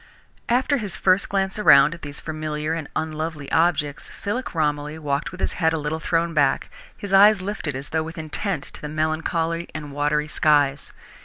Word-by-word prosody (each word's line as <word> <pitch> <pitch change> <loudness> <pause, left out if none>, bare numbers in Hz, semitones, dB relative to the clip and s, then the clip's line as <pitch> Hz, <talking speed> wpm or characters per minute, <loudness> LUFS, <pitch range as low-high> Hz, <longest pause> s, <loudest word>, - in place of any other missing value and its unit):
After 260 +4 +2
his 205 -7 -5
first 190 +1 +2
glance 195 +1 -1
around 150 -6 +7
at 165 - -11
these 145 -1 -8
familiar 155 0 -3
and 165 -2 -4
unlovely 155 -2 -4
objects, 160 -3 +1
Philip 225 +1 -4
Romilly 150 -1 -1
walked 145 -2 -2
with 185 - -11
his - - 0
head 160 -2 +1
a - - 0
little 150 +1 -3
thrown 165 +1 0
back, 145 -3 +1 0.3
his 200 -1 -6
eyes 205 +1 +7
lifted 185 -7 -4
as 135 +2 -6
though 160 - 0
with 165 +2 -7
intent 160 +1 -3
to - - -12
the 150 - -5
melancholy 160 +2 -1
and 150 -2 -6
watery 150 +1 0
skies. 145 -2 +2
160 Hz, 180 wpm, -23 LUFS, 150-175 Hz, 0.3 s, around